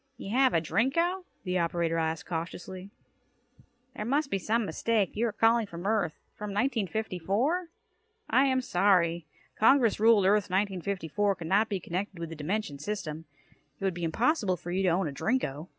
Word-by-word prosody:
"You 195 - -7
have 260 -1 +3
a - - +5
Drinko?" 335 - 0 0.2
the 180 -1 0
operator 170 -1 0
asked 160 0 -2
cautiously. 180 +3 -6 1.1
"There 210 - -4
must 275 +5 0
be 195 - 0
some 225 +4 0
mistake. 200 +3 0
You 230 +3 +1
are - - -2
calling 225 +1 +3
from 170 -1 -8
Earth? 200 -7 +1 0.2
From 210 0 -6
1954? 220 - -1 0.6
I 265 +2 +4
am 260 -1 +2
sorry. 175 -6 +2 0.3
Congress 230 -1 +4
ruled 220 -3 +5
Earth 205 0 +3
1954 195 0 0
could 170 - -8
not 205 +6 +2
be 200 -3 -1
connected 185 +3 -4
with 170 -1 -5
the 165 - -7
dimension 155 -1 -3
system. 165 -4 -5 0.5
It - - -9
would 190 -1 +1
be 175 0 -6
impossible 205 - +1
for 175 - -7
you 185 +2 0
to 190 - +3
own 175 0 +1
a - - -3
Drinko." 150 - -2
195 Hz, 170 wpm, -29 LUFS, 170-225 Hz, 1.1 s, a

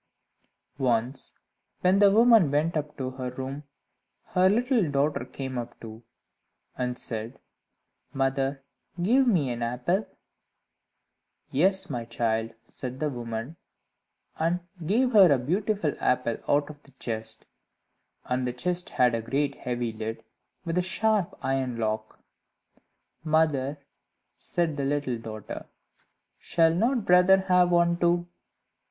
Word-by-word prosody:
Once, 125 0 -1 0.4
when 185 +2 +4
the 205 -1 +7
woman 225 - +6
went 150 +4 +1
up 150 -1 -3
to 130 -2 -3
her 130 -1 -5
room, 130 +3 -6 0.6
her 185 +1 +3
little 235 - +2
daughter 140 -1 0
came 130 -1 -5
up 120 - -8
too, 110 0 -10 0.7
and 125 0 -2
said 115 +2 -5 0.7
"Mother, 135 0 -1 0.4
give 250 +9 +3
me 160 - +2
an 120 0 -4
apple." 125 - -1 1.4
"Yes, 190 +7 +2
my 120 -4 -4
child," 115 -1 -1 0.2
said 130 +1 -7
the 150 -1 -1
woman, 120 +4 -5 0.8
and 170 +3 +1 0.2
gave 235 +10 +2
her 195 -6 +8
a 140 - +5
beautiful 185 - 0
apple 125 -2 +1
out 145 +1 +2
of 145 -1 -16
the 140 - -18
chest; 110 -3 -4 0.8
and 125 0 -1
the 125 - -2
chest 175 +8 -2
had 125 -1 +3
a 115 - -1
great 140 +4 -1
heavy 120 -3 -3
lid, 110 +1 -5 0.4
with 170 +1 0
a - - +3
great 180 - -4
sharp 215 -3 +1
iron 130 -2 -1
lock. 110 -1 -3 1.0
"Mother," 155 -3 +1 0.6
said 165 -4 -2
the 140 - -1
little 135 -4 -1
daughter, 110 -2 -7 0.7
"shall 165 -1 +3
not 230 +5 +1
brother 180 +2 +6
have 180 -1 +3
one 170 0 +3
too?" 175 0 +2
140 Hz, 130 wpm, -27 LUFS, 125-180 Hz, 1.4 s, her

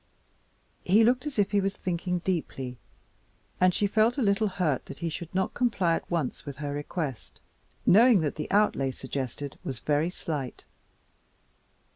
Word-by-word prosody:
He 205 +5 +5
looked 250 +5 +2
as 290 - -5
if 205 -2 +2
he 205 -1 +3
was 195 +1 -1
thinking 180 0 -2
deeply 135 -8 -3 0.8
and 185 0 +5
she 205 - +1
felt 220 +5 +2
a 270 - +1
little 200 +1 +2
hurt 175 -9 -1
that 140 - -8
he 170 - -2
should 165 +1 -6
not 190 0 0
comply 200 -9 +1
at - - -6
once 165 -7 -2
with 140 -1 -7
her 145 -1 -4
request, 145 -2 -5 0.5
knowing 225 0 +6
that 150 -2 -1
the 150 - -5
outlay 200 -10 +2
suggested 130 +1 -5
was 130 - -4
very 150 +6 +1
slight. 150 -7 -5
175 Hz, 160 wpm, -28 LUFS, 145-200 Hz, 0.8 s, knowing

